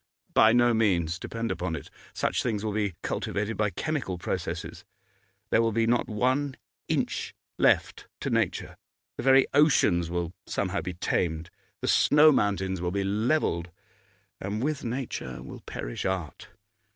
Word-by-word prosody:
'By 110 - +6
no 120 0 +4
means; 90 -7 +1
depend 115 0 -3
upon 90 -2 -2
it. 70 - -8 0.2
Such - - 0
things 110 -4 -2
will 110 - 0
be 100 -4 -1
cultivated 105 +2 -2
by 105 -1 +1
chemical 140 - -3
processes. - - -4 0.7
There - - +5
will 115 -1 +1
not 115 +2 +2
be 110 - -6
one 130 +5 +1 0.3
inch - - -1 0.2
left - - +2
to - - -2
nature; 90 - -1 0.4
the - - -3
very 135 0 +6
oceans 105 - +4
will 85 0 -2
somehow 95 0 -1
be 90 -1 -5
tamed, 85 -2 -1 0.3
the - - -2
snow 150 +1 +6
mountains 95 - 0
will 90 - 0
be 100 +2 -1
levelled. 100 - 0 0.7
And 105 +4 -3
with 150 0 -1
nature 125 +1 -4
will - - -9
perish - - -5
art. 95 -5 -3
105 Hz, 150 wpm, -27 LUFS, 90-120 Hz, 0.7 s, By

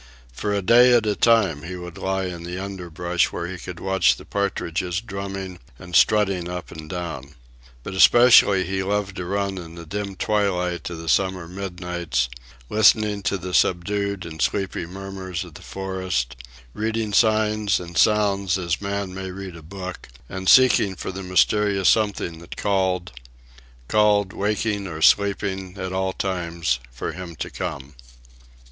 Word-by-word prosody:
For 105 +11 -3
a 100 -1 0
day 120 +5 +6
at 120 -2 +4
a 105 -1 +1
time 105 -11 +3
he 90 +4 -6
would 90 -1 -8
lie 95 0 -1
in 90 -2 -5
the 90 +1 -6
underbrush 90 -2 -2
where 85 - -4
he 90 0 -6
could 90 0 -8
watch 95 0 +3
the - - -13
partridges 90 -3 -2
drumming 95 -3 -6 0.2
and 90 -1 -8
strutting 100 -5 +3
up 90 0 -6
and 80 -1 -9
down. 80 -6 -6 0.5
But 100 - -6
especially 100 -2 +6
he 95 +1 -2
loved 100 0 -1
to 90 - -4
run 100 0 -2
in 85 -1 -10
the 85 0 -9
dim 100 +3 -4
twilight 90 -4 0
of 85 - -6
the 80 0 -8
summer 95 0 +1
midnights, 90 -7 -3 0.4
listening 105 - +3
to 100 - 0
the 90 0 -7
subdued 100 +3 +1
and 80 -2 -7
sleepy 95 -4 -1
murmurs 95 -1 -6
of - - -12
the - - -12
forest, 95 -10 -3 0.4
reading 110 -1 -2
signs 110 -2 +3
and 85 -1 -9
sounds 100 -3 +3
as 90 0 -2
man 100 -1 -3
may 95 0 -5
read 95 -1 -7
a 80 - -10
book, 90 +2 -8 0.2
and 95 +4 -2
seeking 125 -7 +6
for 90 - -5
the 95 +1 -6
mysterious 100 +1 +2
something 100 -6 +1
that 85 - -10
called—called, 85 - -1
waking 105 0 -1
or 80 -3 -6
sleeping, 100 -2 +2
at 95 -1 -4
all 95 0 0
times, 85 -9 -2
for - - -4
him 85 -1 -8
to - - -5
come. 70 +1 -5
95 Hz, 160 wpm, -23 LUFS, 85-100 Hz, 0.5 s, day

